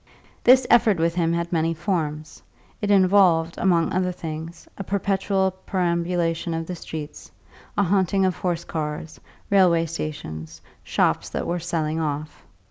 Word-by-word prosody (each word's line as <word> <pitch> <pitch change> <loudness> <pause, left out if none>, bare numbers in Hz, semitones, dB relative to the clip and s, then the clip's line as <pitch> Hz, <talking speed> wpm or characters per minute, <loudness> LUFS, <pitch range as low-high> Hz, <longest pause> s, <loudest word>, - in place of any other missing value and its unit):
This 255 +1 +6
effort 220 -4 +4
with 165 +1 +1
him 165 -1 +1
had 170 +1 -2
many 165 0 +1
forms; 155 -4 -3 0.4
it 205 - -1
involved, 185 -4 +4
among 170 -3 +2
other 180 0 +1
things, 165 -1 -7
a 195 - -6
perpetual 195 0 0 0.2
perambulation 170 -2 0
of 165 0 -3
the 180 - -5
streets, 155 -2 -8 0.5
a 200 - +4
haunting 195 0 +2
of 185 -2 +1
horse 175 -2 -2
cars, 155 -1 -5 0.3
railway 180 -4 +4
stations, 80 - -6 0.2
shops - - 0
that - - -3
were 175 +1 -1
"selling 160 -2 -2
off." 150 -1 -4
170 Hz, 140 wpm, -23 LUFS, 160-190 Hz, 0.5 s, This